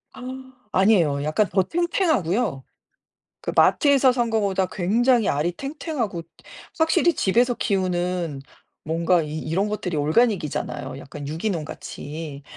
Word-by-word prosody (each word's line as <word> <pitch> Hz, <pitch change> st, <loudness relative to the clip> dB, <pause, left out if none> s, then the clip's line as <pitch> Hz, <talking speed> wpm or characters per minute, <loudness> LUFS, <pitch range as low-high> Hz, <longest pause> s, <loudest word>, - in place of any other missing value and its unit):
아 -, -, -10 dB, 0.5 s
아니에요. 175 Hz, -8 st, +3 dB
약간 155 Hz, +7 st, +1 dB
더 190 Hz, 0 st, +2 dB
탱탱하고요. 250 Hz, -, 0 dB, 0.8 s
그 -, -, -3 dB
마트에서 275 Hz, -3 st, +5 dB
산 240 Hz, -2 st, 0 dB
거보다 195 Hz, -4 st, +1 dB
굉장히 230 Hz, +5 st, +2 dB
알이 150 Hz, +5 st, +1 dB
탱탱하고 275 Hz, -, -4 dB, 0.6 s
확실히 330 Hz, +1 st, +3 dB
집에서 240 Hz, +5 st, +2 dB
키우는 180 Hz, -6 st, -1 dB, 0.4 s
뭔가 170 Hz, +2 st, +2 dB
이 150 Hz, +1 st, -5 dB
이런 190 Hz, +6 st, -1 dB
것들이 180 Hz, -6 st, -3 dB
organic이잖아요 150 Hz, -, 0 dB
약간 140 Hz, 0 st, -8 dB
유기농같이. 155 Hz, -3 st, -5 dB
185 Hz, 315 characters per minute, -23 LUFS, 155-240 Hz, 0.8 s, 마트에서